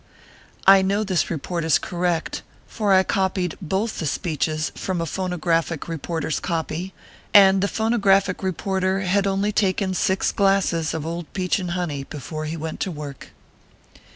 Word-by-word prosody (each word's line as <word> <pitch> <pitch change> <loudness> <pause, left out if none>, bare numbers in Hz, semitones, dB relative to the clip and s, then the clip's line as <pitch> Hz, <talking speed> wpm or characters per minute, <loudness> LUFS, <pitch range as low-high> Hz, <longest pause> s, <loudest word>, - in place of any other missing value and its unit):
I 195 0 +8
know 200 +3 +1
this 185 -6 0
report 170 +2 -3
is 160 -2 +4
correct, 175 -2 -2 0.3
for 210 -3 -1
I 190 0 +6
copied 185 -2 0
both 190 +6 -2
the 160 - -2
speeches 155 0 -1
from 185 -2 -3
a 165 - -1
phonographic 170 -2 -1
reporter 165 -1 -3
s 155 - 0
copy, 170 +1 -3 0.4
and 195 -1 +7
the 200 - +2
phonographic 200 -4 +2
reporter 190 +1 -1
had 195 +1 +1
only 195 +2 +1
taken 195 -2 +1
six 190 +1 +1
glasses 195 -5 +1
of 160 -1 -4
old 170 0 -5
peach 185 0 0
and 180 -2 -4
honey 150 -6 -3
before 155 +2 -6
he 160 +2 -4
went 160 0 -5
to - - -1
work. 145 -4 -8
180 Hz, 155 wpm, -23 LUFS, 160-195 Hz, 0.4 s, I